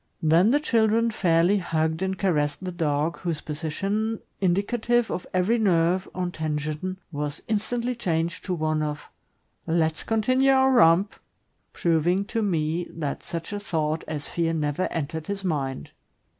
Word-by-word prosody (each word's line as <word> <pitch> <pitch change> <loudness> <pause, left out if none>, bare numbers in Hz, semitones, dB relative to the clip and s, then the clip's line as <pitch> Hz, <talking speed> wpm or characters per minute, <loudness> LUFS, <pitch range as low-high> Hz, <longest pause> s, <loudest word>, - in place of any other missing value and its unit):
Then 165 +6 +5
the 285 +4 +4
children 230 -4 +2
fairly 180 0 +3
hugged 160 -1 -1
and 190 0 -1
caressed 150 -4 0
the 185 - -3
dog, 155 -1 -1
whose 170 -4 -2
position, 195 +9 -2 0.2
indicative 220 +6 +1
of 180 - -4
every 190 +6 +2
nerve 185 -2 +2
on 180 -1 -2
tension, 155 +3 -3
was 145 -1 -3
instantly 235 +3 -1
changed 170 -7 -2
to 185 - -1
one 155 -1 0
of 150 -1 -4 0.6
'Let's 160 -1 +1
continue 255 +5 +2
our 265 0 +4
romp," 195 -4 +5 0.6
proving 175 +3 +1
to 225 - +1
me 170 -3 0
that 150 -4 -4
such 170 +4 -6
a 205 - -2
thought 160 -6 -1
as 150 -2 -4
fear 165 -1 -1
never 150 +2 0
entered 160 0 -4
his 200 -1 -3
mind. 135 - -2
175 Hz, 145 wpm, -25 LUFS, 155-205 Hz, 0.6 s, Then